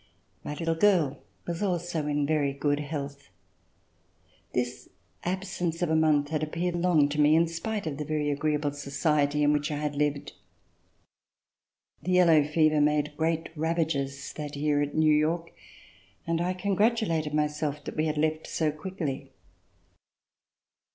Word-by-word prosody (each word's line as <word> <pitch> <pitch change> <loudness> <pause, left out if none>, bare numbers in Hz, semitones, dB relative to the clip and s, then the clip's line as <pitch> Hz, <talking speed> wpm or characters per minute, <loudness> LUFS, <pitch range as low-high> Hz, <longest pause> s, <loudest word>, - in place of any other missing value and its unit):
My 150 - -5
little 165 +1 -1
girl 165 -6 +2 0.2
was 170 +1 -4
also 175 -5 -1
in 145 -1 +1
very 145 -2 +1
good 145 +1 0
health. 140 - -6 1.2
This 125 0 -3 0.3
absence 180 -2 -2
of 165 - 0
a - - +3
month 150 -2 +3
had 155 -1 -1
appeared 170 +3 -2
long 170 -4 +3
to 150 +1 0
me, 150 +1 +5
in 165 +1 +4
spite 200 +5 -4
of 150 -3 -3
the - - -1
very 150 -1 -1
agreeable 150 0 0
society 145 +1 0
in 145 0 +4
which 150 0 0
I 150 - -2
had 150 0 -2
lived. 145 -1 -1 1.7
The 185 - -1
yellow 170 -4 +6
fever 155 0 +3
made 150 0 +1
great 165 +1 -1
ravages 155 -4 -1
that 150 -1 -5
year 145 0 +1
at 145 0 -2
New 155 -1 +4
York, 165 +3 +1 0.7
and 165 0 0
I 180 +1 0
congratulated 195 -5 +1
myself 150 -1 -1
that - - -7
we 155 +1 +1
had 155 -1 -2
left 155 +1 0
so 155 -2 0
quickly. 150 -5 -5
155 Hz, 150 wpm, -28 LUFS, 145-165 Hz, 1.7 s, yellow